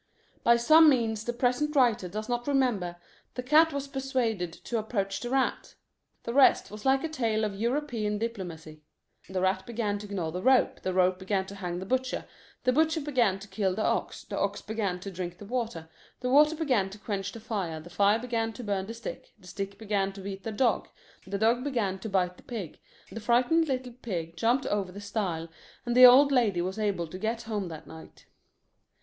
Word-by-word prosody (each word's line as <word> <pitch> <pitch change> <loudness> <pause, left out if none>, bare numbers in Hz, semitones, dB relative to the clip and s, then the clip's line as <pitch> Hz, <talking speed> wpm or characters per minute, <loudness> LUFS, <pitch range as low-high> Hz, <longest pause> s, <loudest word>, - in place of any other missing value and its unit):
By 235 0 +6
some 310 +6 +7
means 225 -5 +1
the 240 - 0
present 250 +5 0
writer 235 -8 +3
does 215 +4 -5
not 240 +1 -2
remember, 245 -11 +1 0.4
the 250 - -4
cat 310 +5 +5
was 280 -1 -4
persuaded 255 -9 -1
to 230 +7 -4
approach 200 -3 -2
the 240 - -5
rat. 265 0 -1 0.5
The 235 - -4
rest 270 -6 +5
was 210 +3 -9
like 270 0 +3
a - - 0
tale 230 -8 -1
of 210 -2 -1
European 230 -1 -1
diplomacy: 175 -9 -6 0.5
The 190 -1 -2
rat 190 0 0
began 215 -3 -2
to 205 0 -9
gnaw 175 -5 -2
the 180 +2 -4
rope, 260 +2 +3
The 185 - -2
rope 185 0 +3
began 190 0 -1
to 195 - -9
hang 180 -3 -4
the 185 - -5
butcher, 260 +4 -1 0.4
The 255 - +3
butcher 320 +3 +2
began 250 -10 +1
to 195 +1 -11
kill 195 -3 -1
the 215 - -1
ox, - - -1
The - - -5
ox 200 +1 -1
began 205 -5 -2
to 195 - -6
drink 175 -1 -5
the 205 - -10
water, 225 -8 -3 0.3
The 250 0 -1
water 300 +3 +6
began 255 -12 +1
to 200 - -10
quench 200 -2 -4
the 230 - -9
fire, 190 -8 -3
The 170 +3 -12
fire 200 +4 +3
began 230 -1 -2
to 245 - -8
burn 195 -2 -2
the 230 - -6
stick, 230 - -8
The 195 - -20
stick 195 +2 -5
began 200 -2 -1
to 195 - -9
beat 195 0 -6
the 225 - -4
dog, 235 +2 +1 0.4
The 200 +1 -2
dog 230 +4 +2
began 225 -9 -1
to 220 - -6
bite 180 -2 0
the - - -16
pig, 215 - -7 0.3
The 225 - -6
frightened 245 +9 +3
little 255 -3 -3
pig 170 -7 -4
jumped 240 +7 +1
over 200 -3 -1
the 200 - -9
stile, 195 -5 -3 0.4
And 240 0 -1
the 255 0 +11
old 275 +3 +7
lady 225 -9 +2
was 190 +4 -4
able 200 -5 0
to 185 +3 -9
get 225 +3 -2
home 210 -4 -3
that 160 -3 -8
night. 160 0 -13
215 Hz, 210 wpm, -28 LUFS, 190-250 Hz, 0.5 s, the